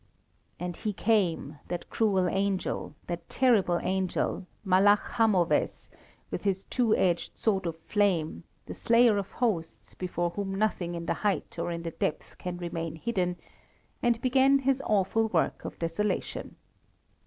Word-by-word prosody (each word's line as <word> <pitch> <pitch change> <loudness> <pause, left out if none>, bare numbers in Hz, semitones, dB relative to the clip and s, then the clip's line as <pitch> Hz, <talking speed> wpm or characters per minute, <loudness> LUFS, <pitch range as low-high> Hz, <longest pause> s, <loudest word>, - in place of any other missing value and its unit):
And 175 -1 -4
he 215 -2 -2
came, 180 -9 +1
that 175 -1 -5
cruel 195 -5 +2
angel, 190 -3 -1
that 170 -1 -5
terrible 210 -9 +3
angel, 185 0 -1 0.2
Malach 200 +2 +4
Hamovez, 200 -7 +2 0.4
with - - -3
his 195 -1 0
two 235 -4 +2
edged 175 -2 0
sword 195 -5 +1
of 165 -1 -4
flame, 165 - 0 0.2
the - - -6
slayer 230 -2 +4
of 195 - -6
hosts, 200 -10 -2
before 175 -1 -2
whom 195 +1 -3
nothing 195 -4 0
in 170 0 -5
the - - +1
height 205 -2 -1
or - - -1
in 170 -1 -4
the 165 - -3
depth 155 - -3
can 180 -1 -4
remain 165 -2 -4
hidden, 180 -1 -1 0.7
and 240 -1 +2
began 265 +2 +4
his 270 0 +1
awful 215 +2 +2
work 175 -7 0
of - - -6
desolation. 170 +5 -2
190 Hz, 145 wpm, -28 LUFS, 175-215 Hz, 0.7 s, Malach